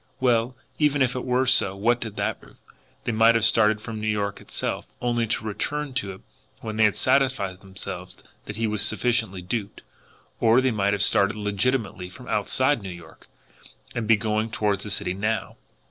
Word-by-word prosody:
Well, 125 -1 +2 0.2
even 145 -2 +3
if 125 -1 0
it 125 - -4
were 125 +1 +1
so, 95 -6 +3
what 115 +5 +1
did 110 -3 -5
that - - -2
prove! - - -18 0.5
They - - -1
might 115 +1 +5
have 115 -1 +3
started 110 -1 +4
FROM 110 0 -6
New 110 - -2
York 100 -2 -1
itself - - -4
only 120 -1 0
to 110 0 -2
return 145 +7 -3
to 100 -7 -2
it 95 - -14 0.4
when 110 -1 -5
they 110 - +5
had 105 - +2
satisfied 130 -9 +1
themselves 95 -1 -7 0.3
that 105 - -6
he 115 +1 -1
was 105 -1 +1
sufficiently 110 -4 0
duped. 100 +2 -4 0.6
Or 115 +2 +5
they 130 0 +2
might 100 -2 +1
have 100 -1 +2
started 100 +1 +4
legitimately 105 -2 -1
from 125 +7 -13
outside 130 +6 +1
New 95 - -6
York, 85 -2 -12 0.7
and 115 -3 -3
be 115 - +7
going 110 +1 -1
toward 105 -3 0
the 105 - -5
city 95 -2 -1
now. 105 +4 -2
110 Hz, 190 wpm, -25 LUFS, 100-120 Hz, 0.7 s, be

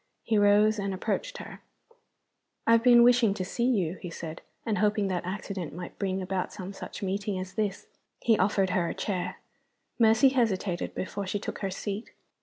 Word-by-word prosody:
He 225 - 0
rose, 205 +1 +4
and 195 -1 -2
approached - - -2
her. - - -9 1.0
"I - - +4
have 230 0 +6
been 240 -1 +8
wishing 240 -4 +5
to 185 -3 -3
see 235 +5 -1
you," 190 -8 0
he 175 - -5
said, 165 -1 -7 0.2
"and 215 -2 0
hoping 210 -1 +2
that 180 -2 -1
accident 185 -4 -5
might 180 - -8
bring 190 -1 -1
about 185 0 -2
some 195 -1 -7
such 195 - -8
meeting 195 +1 -2
as 185 0 -6
this." 210 -3 -2 0.3
He 230 - +3
offered 195 -1 +2
her 175 -2 +1
a - - -4
chair. 185 -4 -2 0.6
Mercy 225 +3 +6
hesitated 205 -8 0
before 200 +1 -4
she 205 - -1
took 200 - -5
her 195 - -2
seat. 200 +3 -5
200 Hz, 185 wpm, -28 LUFS, 185-220 Hz, 1.0 s, been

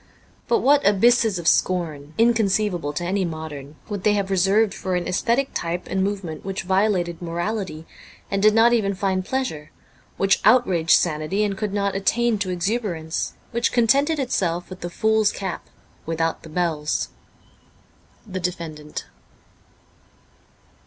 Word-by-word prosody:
But 460 - +2
what 285 +1 +4
abysses 220 +1 +4
of 170 -1 -4
scorn, 155 -6 0
inconceivable 210 -8 +2
to 160 - -3
any 190 +2 0
modern, 155 -4 -6
would 205 -3 -5
they 210 - +4
have 195 -1 -1
reserved 195 +3 +3
for 185 -1 -3
an 175 -1 -2
aesthetic 240 +8 0
type 175 +1 -3
and 190 0 0
movement 195 -5 -4
which 195 0 -4
violated 190 -3 +1
morality 175 -1 -3 0.5
and 195 0 0
did 215 +1 +5
not 230 +1 +5
even 200 -4 +1
find 190 -1 0
pleasure, 180 - -3 0.5
which 195 0 +2
outraged 190 -8 +3
sanity 165 +5 0
and 205 -2 -1
could 210 0 -3
not 200 -1 0
attain 225 +3 +1
to 195 -2 -2
exuberance, 180 -3 -2 0.2
which 235 -1 0
contented 275 +7 +3
itself 180 - -1
with 185 - -8
the 175 - -5
fool's 220 +2 +2
cap 190 -3 -5 0.4
without 165 0 -1
the 160 - -12
bells! 155 -3 -1 0.6
' - - -33
The 185 - -2
Defendant.' 165 -4 -5
190 Hz, 145 wpm, -23 LUFS, 170-215 Hz, 0.6 s, did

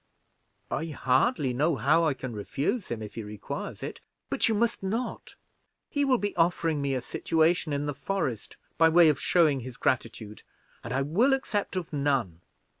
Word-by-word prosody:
"I 160 - -1
hardly 135 - +1
know 150 +5 +2
how 155 +5 +3
I 150 -4 +1
can 130 -2 -6
refuse 140 - -2
him, 115 -2 -4
if 105 - -8
he 115 - -5
requires 105 -1 -6
it." - - -6 0.3
"But - - +2
you 220 - +2
must 230 +2 0
not. 225 +6 -4 0.6
He 285 -1 +1
will 260 -2 +3
be 205 -2 -3
offering 165 -3 +1
me 140 -1 0
a 130 - -1
situation 160 +5 +1
in 145 0 -1
the 145 - -2
forest, 140 - -3 0.2
by 165 0 +7
way 165 0 +6
of 150 - 0
showing 155 -6 +3
his 125 +1 -8
gratitude, 115 -5 -2 0.4
and 115 - -6
I 135 +2 +1
will 215 - +3
accept 210 -8 -1
of 175 -4 -4
none. 135 - 0
150 Hz, 180 wpm, -28 LUFS, 130-180 Hz, 0.6 s, by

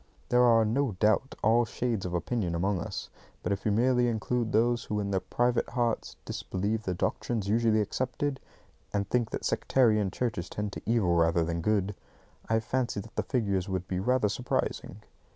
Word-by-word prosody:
There 125 0 +4
are, 115 -2 +5
no 125 +2 +1
doubt, 105 +7 +1
all 115 +3 +5
shades 115 -5 -2
of 90 - -3
opinion 85 0 -1
among 95 +2 0
us; - - -5 0.3
but - - -1
if 100 +2 -1
you - - +3
merely 125 +3 +3
include 115 0 -1
those 120 +2 +2
who 105 - -2
in 100 -1 -2
their 95 - +2
private 120 +4 0
hearts 120 -2 -1
disbelieve 105 +4 -2
the 90 - -1
doctrines 105 +3 -1
usually 110 0 +3
accepted, 130 +6 -2 0.5
and 100 -1 -1
think 120 +1 +1
that - - -4
sectarian 110 -6 +2
churches 110 -5 -3
tend 105 -1 -4
to - - -6
evil 110 -7 +3
rather 85 0 +3
than 85 +1 -2
good, 105 +1 +1 0.6
I 110 0 +2
fancy 120 -2 -1
that 110 +3 -10
the - - +1
figures 100 -7 -1
would 95 -1 -2
be 90 - -2
rather 125 +2 +2
surprising. 120 +5 -2
110 Hz, 180 wpm, -29 LUFS, 95-120 Hz, 0.6 s, are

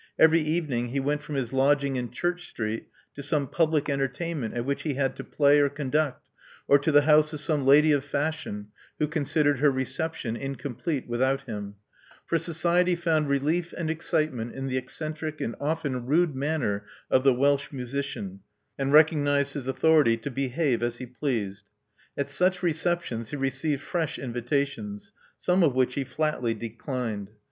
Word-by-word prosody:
Every 160 +1 +6
even 155 -2 -1
ing 120 0 0
he 135 +3 -1
went 145 +2 0
from 150 0 -6
his 130 -3 -2
lodging 140 0 +2
in 125 -2 -2
Church 175 +7 -3
Street 110 0 -4 0.3
to 140 - -7
some 145 0 0
public 155 0 +1
entertainment 140 -1 -2
at 120 0 -2
which 140 +1 -1
he 150 -4 -2
had 135 -1 0
to - - -5
play 145 0 +4
or 145 -1 +4
con 140 -2 -5
duct, 150 -3 0 0.4
or 140 - +6
to 145 +3 +1
the 145 0 +6
house 150 0 +4
of 155 - -4
some 150 -2 0
lady 150 +3 +7
of 145 -2 +2
fashion 140 -8 -3 0.3
who 150 - +1
considered 145 -2 +1
her 145 +1 +5
reception 130 -1 -2
incomplete 135 +2 -4
without 130 +3 +1
him; 105 -4 -6 0.5
for 165 - +1
society'* 170 +2 +2
found 160 -4 +1
relief 155 +5 0
and 160 -2 -1
excitement 155 -7 -1
in 135 0 -4
the 130 -1 -2
eccentric 155 +4 -4
and 115 - -3
often 145 -5 -2
rude 160 +2 +3
manner 130 -8 -1 0.3
of 130 - +4
the 135 -2 +5
Welsh 140 +2 +2
musician, 125 -7 -4 0.4
and 135 0 0
recognized 145 -2 +4
his 135 -3 -5
authority 145 -4 +4
to 130 +5 -6
behave 135 -1 0
as 120 0 -1
he 125 - -6
pleased. 115 -6 -3 0.5
At 140 - -1
such 180 +4 +1
receptions 165 -9 -1
he - - -4
received 135 +1 -1
fresh 165 -4 -2
invitations, 140 - -3 0.2
some 180 +1 +2
of 150 -7 +3
which 130 -1 +2
he 140 - -1
flatly 130 -4 -1
declined. 115 -2 -4
140 Hz, 170 wpm, -27 LUFS, 130-155 Hz, 0.5 s, lady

